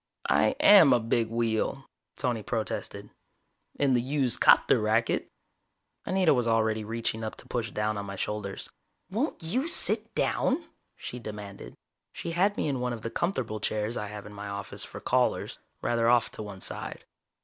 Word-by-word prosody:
"I - - +3
am 195 -10 +8
a 120 - +4
big 115 0 0
wheel," 115 +4 -1 0.3
Tony 120 -3 -1
protested. 110 0 -4 0.7
"In 140 -2 +3
the 120 - +3
used 130 -1 0
'copter - - +6
racket." 110 +2 +1 0.8
Anita 185 -4 +3
was 125 -3 +1
already 110 -1 +1
reaching 115 0 -3
up 110 - -4
to - - -11
push 115 -2 -2
down 105 0 -1
on 100 - -6
my 100 - -5
shoulders. 100 0 -4 0.4
"Won't 225 - -2
you 245 - 0
sit - - +3
down?" 310 +6 +1 0.3
she 125 - -6
demanded. 105 -3 -8 0.4
She 170 - -5
had 195 +5 +2
me - - 0
in 135 -3 -1
one 125 0 -1
of 115 - -7
the 115 - -5
comfortable 130 - -2
chairs 105 +2 -1
I 105 - -3
have 105 0 -8
in 105 - -10
my 105 0 -7
office 100 -1 -4
for - - -8
callers, - - 0 0.2
rather 115 -1 +2
off 120 -1 +3
to - - -7
one 100 -3 -8
side. - - -6
115 Hz, 170 wpm, -28 LUFS, 105-135 Hz, 0.8 s, am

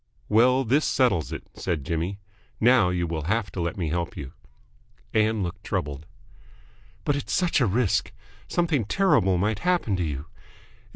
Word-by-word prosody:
"Well, 125 +5 +4
this 135 +6 +2
settles 120 - +2
it," - - -5
said 75 -6 -3
Jimmy. 85 +5 -2 0.4
"Now 120 -5 +5
you 90 -1 0
will 80 -2 -3
have 100 0 0
to 90 - -4
let 85 +2 -2
me 85 -4 -1
help 85 +1 -2
you." 70 -2 -7 0.8
Ann 110 -1 +2
looked 90 +3 -5
troubled. 75 -5 -3 1.0
"But 145 - +2
it's 145 - -3
such 175 -5 +2
a 120 - +4
risk. 105 +1 +1 0.4
Something 165 -8 +1
terrible 100 - +3
might 105 +3 0
happen 175 - +1
to 90 - 0
you. 75 -2 -3
100 Hz, 160 wpm, -25 LUFS, 85-125 Hz, 1.0 s, Now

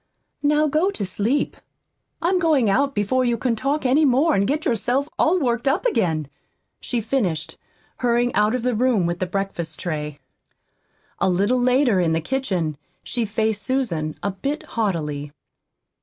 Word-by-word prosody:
Now 300 +1 +3
go 310 +6 +2
to 215 - -3
sleep. 220 +9 0 0.7
I'm 365 +2 +2
going 295 - +3
out 280 +5 +1
before 205 +6 +1
you 240 -1 +1
can 235 +1 0
talk 275 +5 -1
any 270 +5 +4
more, 285 +4 +4
and 200 0 +2
get 300 +3 -1
yourself 250 +5 0
all 345 +4 +4
worked 240 -3 0
up 305 - +1
again," 170 - +1 0.5
she 245 - -2
finished, 205 - -1 0.4
hurrying 240 0 +1
out 210 +3 +2
of 250 - -3
the 250 0 +1
room 230 -5 +2
with 175 +1 -2
the 185 - -1
breakfast 180 -4 -3
tray. 150 -4 -4 1.0
A 190 - +2
little 205 +8 +2
later 250 -4 +3
in 165 -2 +2
the 160 - +1
kitchen 180 - -2 0.3
she 240 -2 -1
faced 215 0 -1
Susan 190 - -1
a 200 - 0
bit 275 +10 -3
haughtily. 150 -10 -2
235 Hz, 160 wpm, -22 LUFS, 185-270 Hz, 1.0 s, any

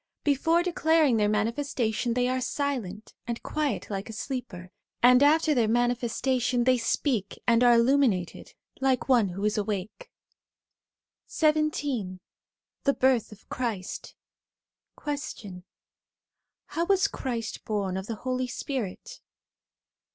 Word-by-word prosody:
Before 325 +4 +2
declaring 320 -7 +3
their 210 -1 +2
manifestation, 230 +1 -1
they 250 0 +2
are 255 0 -1
silent 235 -7 -3
and 235 -1 -4
quiet 280 - -2
like 195 +2 -4
a - - -6
sleeper, 215 -7 -6 0.3
and 250 +1 +7
after 310 +2 +4
their 235 -5 +2
manifestation, 245 +1 +1
they 255 0 +3
speak 230 -3 -1
and 235 0 +4
are 240 -1 +6
illuminated, 235 -7 +1 0.2
like 265 -1 +1
one 240 -7 +4
who 195 +3 -4
is 210 +1 +1
awake. 210 - -4 1.2
XVII 295 - 0 0.7
THE 280 - +2
BIRTH 255 -4 +2
OF 210 - -15
CHRIST 225 -8 -4 0.8
Question. 230 -11 -6 1.0
How 335 +1 -2
was 390 -1 +3
Christ 230 -4 -5
born 200 -4 -2
of 190 +1 -4
the 225 - -3
Holy 255 0 -1
Spirit 250 -6 -5
245 Hz, 120 wpm, -27 LUFS, 215-275 Hz, 1.2 s, and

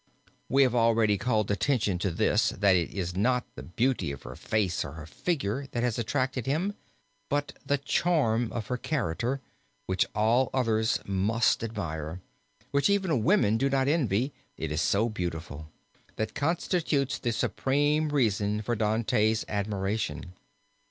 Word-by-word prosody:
We 135 +1 +5
have 125 -3 +2
already 115 -3 +3
called 110 -4 +1
attention 105 -3 +1
to 100 - 0
this, 85 - +2
that 100 -1 +3
it 85 -2 +1
is 90 -2 -3
not 125 +5 +1
the - - -8
beauty 115 - 0
of 70 - -8
her - - -8
face 100 -5 0
or 70 - -7
her 80 -1 -8
figure 135 - -2
that 120 - -1
has 120 -2 0
attracted 130 +2 -1
him, 170 +9 0 0.6
but 145 0 -1
the 145 - +1
charm 135 -6 +1
of 115 -3 -4
her 125 - -2
character, 125 - -2 0.4
which 95 -1 +1
all 115 +5 +3
others 115 -3 +2
must 105 +5 +1
admire 85 -7 -4 0.5
which 140 +6 +3
even 190 - +1
women 110 0 +3
do 135 - +2
not 135 -1 +1
envy, 135 - +1 0.2
it 80 -2 -4
is 75 +2 0
so 105 +6 +2
beautiful 85 -7 -5 0.5
that 110 - -3
constitutes 155 -2 0
the 120 - -1
supreme 145 +6 +1
reason 105 -6 +1
for 120 +3 -1
Dante's 110 0 +1
admiration. 100 -2 -2
115 Hz, 150 wpm, -28 LUFS, 100-135 Hz, 0.6 s, We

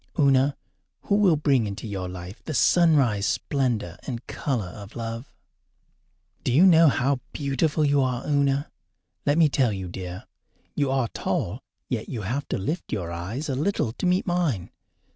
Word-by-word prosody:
Una, 140 -2 +3 0.5
who 200 - +1
will 200 -5 +5
bring 135 -6 +2
into 100 +3 -6
your 95 -4 -4
life 90 +3 -9
the 155 - -3
sunrise 140 - +4
splendour 120 - -1
and 120 -3 -5
colour 120 -10 -2
of 100 +2 -11
love? 115 +2 -5 1.1
Do - - 0
you 155 +10 +6
know 165 -3 +7
how 135 -1 +2
beautiful 150 +2 0
you 145 -1 +3
are, 130 -1 -1
Una? 140 -1 +1 0.6
Let 145 +2 +3
me 165 -2 +6
tell 135 -5 +2
you, 95 -2 -4
dear. 90 0 -7 0.5
You 140 -2 0
are 130 -3 +1
tall, 105 +9 -2 0.3
yet 115 -4 -3
you 115 -6 -4
have 130 +9 -2
to - - -2
lift 155 - -3
your 90 -5 -3
eyes 100 - -4
a 140 - -1
little 145 - 0
to 180 - -2
meet 180 +1 +2
mine. 170 - -1
130 Hz, 165 wpm, -25 LUFS, 105-145 Hz, 1.1 s, know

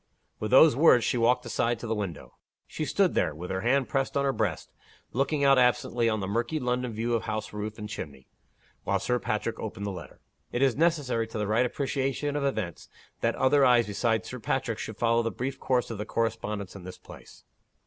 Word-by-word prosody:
With 110 - -3
those 140 +2 +7
words 135 -5 +6
she 120 - 0
walked 125 +2 +2
aside 120 +1 0
to 115 - -8
the 115 - -1
window. 85 - -5 0.3
She - - -4
stood - - +2
there, 80 - 0
with 90 +4 -6
her 95 0 -2
hand 130 +3 +2
pressed 135 +4 -1
on 140 - +1
her 135 - +1
breast, 100 -10 -2 0.4
looking 140 +3 0
out 135 -1 +6
absently 120 -1 +2
on 110 -2 -1
the 95 - -3
murky 120 +9 -1
London 125 -1 -1
view 115 +2 -2
of 115 - 0
house 110 -1 -4
roof 105 +1 -5
and 105 -1 -6
chimney, 70 -10 -8 0.6
while - - +1
Sir - - 0
Patrick - - -2
opened 100 - -5
the 100 - -2
letter. 90 - -10 0.3
It 120 - 0
is 135 -3 +3
necessary 145 -8 +1
to 110 - -7
the 105 - -1
right 115 +5 +2
appreciation 140 +2 -2
of 145 - -1
events, 110 - -3 0.3
that - - 0
other 140 +2 +4
eyes 120 -2 +5
besides 110 +2 0
Sir 125 - -6
Patrick's 115 0 -2
should 110 - -6
follow 115 0 +2
the 115 - -1
brief 130 +4 -4
course 125 -2 0
of 110 - -6
the 105 - -3
correspondence 105 -4 -2
in 95 - -9
this 90 0 -9
place. - - -14
115 Hz, 215 wpm, -28 LUFS, 105-130 Hz, 0.6 s, those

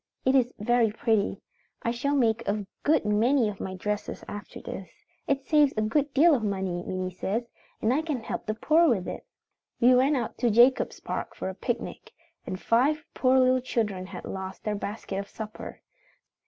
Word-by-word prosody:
It 260 - +4
is 255 -2 +3
very 235 +1 +2
pretty. 220 -1 0 0.4
I 230 - +1
shall 280 +5 -1
make 235 -4 +2
a 205 0 -1 0.2
good 305 -5 +2
many 225 +3 +3
of 200 - -8
my 190 - -4
dresses 210 +2 -4
after 205 -1 -8
this. 190 - -7 0.4
It 275 -1 0
saves 295 -3 +4
a 215 - +2
good 280 +6 +1
deal 315 +5 +5
of 260 - +2
money, 190 -4 -2
Minnie 185 0 -3
says, 225 +6 -3 0.3
and 225 +3 +3
I 295 - +2
can 300 -6 -3
help - - -5
the 215 - -1
poor 320 +8 +4
with 195 -7 0
it. - - -6 0.5
"We 250 +1 +6
went 270 +3 +4
out 235 - -4
to 240 - +3
Jacobs 240 +4 +4
Park - - -4
for - - -4
a - - -5
picnic, - - -4 0.3
and 185 0 -4
five 285 +9 +2
poor 260 0 +3
little 255 0 +4
children 210 -7 -2
had - - -8
lost 190 0 -6
their 210 - -1
basket 200 -1 -4
of 200 - -5
supper. 215 0 -8
230 Hz, 190 wpm, -27 LUFS, 205-265 Hz, 0.5 s, We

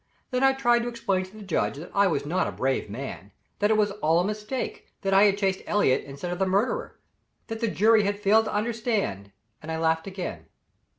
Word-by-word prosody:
Then 250 0 0
I 270 0 +5
tried 240 -3 +3
to 235 - -3
explain 195 -6 -1
to 190 +3 -15
the 215 - -9
judge 185 -6 -1
that 165 +4 -9
I 200 0 +4
was 145 -5 -1
not 180 +5 0
a - - -3
brave 130 -4 -1
man 105 -3 -7 0.3
that 205 - +2
it 220 - +3
was 210 -1 +2
all 165 -5 +2
a - - +2
mistake; 210 +5 -4
that 195 -1 0
I 195 +2 +7
had 200 -1 +3
chased 195 -2 0
Elliott 205 -11 +2
instead 140 +6 -6
of 175 - -4
the 190 - +2
murderer; 215 - 0 0.5
that 225 0 -5
the 230 - 0
jury 220 +1 +4
had 205 0 -1
failed 215 +2 +4
to - - -3
understand 215 - -1 0.3
and 155 - -6
I 160 - -2
laughed 160 +2 +1
again. 190 -2 -6
200 Hz, 225 wpm, -26 LUFS, 165-220 Hz, 0.5 s, I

